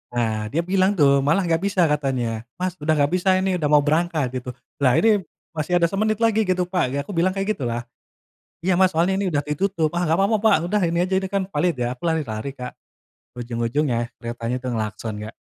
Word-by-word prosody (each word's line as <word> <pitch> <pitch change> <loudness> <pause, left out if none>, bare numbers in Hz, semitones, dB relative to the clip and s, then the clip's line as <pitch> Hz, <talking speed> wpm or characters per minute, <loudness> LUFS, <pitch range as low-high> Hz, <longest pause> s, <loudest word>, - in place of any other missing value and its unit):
Nah, 115 -2 +1 0.2
dia 165 - +1
bilang 185 +2 +2
tuh, 140 -5 +4
malah 165 +7 +3
nggak 165 0 +1
bisa 200 -2 +1
katanya. 125 -6 -1 0.2
"Mas, 185 0 -2
udah 155 0 0
nggak 145 -1 +2
bisa 185 +1 +2
ini, 190 -1 0
udah 150 -3 0
mau 150 -1 +6
berangkat," 155 -2 +1
gitu. 125 - -7 0.3
"Lah 130 -3 +3
ini 210 -4 +3 0.3
masih 175 +3 +1
ada 170 - +5
semenit 215 +2 0
lagi 220 -1 +3
gitu 185 0 +1
Pak." 180 -1 +1
Ya 140 - -1
aku - - -9
bilang 180 +3 +2
kayak 195 +2 -1
gitulah. 120 -3 -3 0.8
"Iya 180 0 +2
Mas 185 -2 +4
soalnya 185 +4 +2
ini 200 - 0
udah 145 -1 +1
ditutup", 160 +1 -1
"ah 175 +1 0
nggak 165 - +2
apa 195 - +3
apa 220 - +3
Pak. 220 -6 +4
Udah 210 -1 +2
ini 170 +1 +1
aja 190 +1 -1
ini 190 - -4
kan 195 -1 0
valid 175 -3 +1
ya." 120 0 -1
Aku - - -22
lari-lari 140 -6 -2
Kak. 125 -2 -7 0.7
Ujung-ujungnya 120 +1 -1
keretanya 120 +1 -3
udah 125 0 -4
ngelakson 110 0 -4
Kak. 110 - -8
160 Hz, 215 wpm, -22 LUFS, 125-190 Hz, 0.8 s, mau